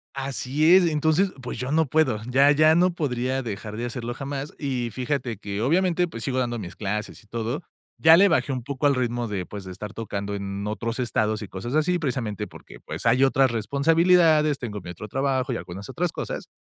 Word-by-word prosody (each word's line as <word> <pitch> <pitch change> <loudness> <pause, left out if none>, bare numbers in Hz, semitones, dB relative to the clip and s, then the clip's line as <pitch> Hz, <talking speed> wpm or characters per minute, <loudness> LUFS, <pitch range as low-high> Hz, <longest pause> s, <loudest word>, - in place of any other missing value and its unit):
Así 140 +4 +2
es, 185 -2 +6
entonces, 160 +5 +2
pues 125 - -6
yo 125 +2 -3
no 160 0 +3
puedo, 130 -7 +2
ya 135 +3 +5
ya 155 +2 +5
no 180 +1 +3
podría 130 -4 -1
dejar 105 -1 -6
de 120 - -3
hacerlo 120 -1 -4
jamás. 140 +2 -5
Y 125 -5 -2
fíjate 125 -1 -2
que 100 +1 -4
obviamente, 175 +4 +2
pues 115 -6 -7
sigo 130 -1 -1
dando 120 -2 -1
mis 95 -3 -7
clases 105 +2 -4
y 105 - -25
todo, 115 - -3 0.3
ya 160 +1 +7
le 200 +3 +6
bajé 160 -4 +1
un 125 -2 -4
poco 140 +1 -1
al 140 -2 +3
ritmo 120 -2 -1
de, 95 -4 -3
pues 100 -1 -7
de 95 - -8
estar 105 +3 -7
tocando 100 -3 -4
en 100 0 -4
otros 115 +3 -3
estados 110 -3 0
y 100 - -6
cosas 120 +8 -6
así, 175 +3 +2
precisamente 125 - -3
porque, - - -14
pues - - -6
hay 130 +2 +4
otras 135 -2 +4
responsabilidades, 155 - +3
tengo 105 -5 -5
mi 90 - -9
otro 90 +4 -8
trabajo 135 +2 -1
y - - -1
algunas 95 +3 -8
otras 175 +5 -1
cosas. - - -5
130 Hz, 210 wpm, -25 LUFS, 110-150 Hz, 0.3 s, ya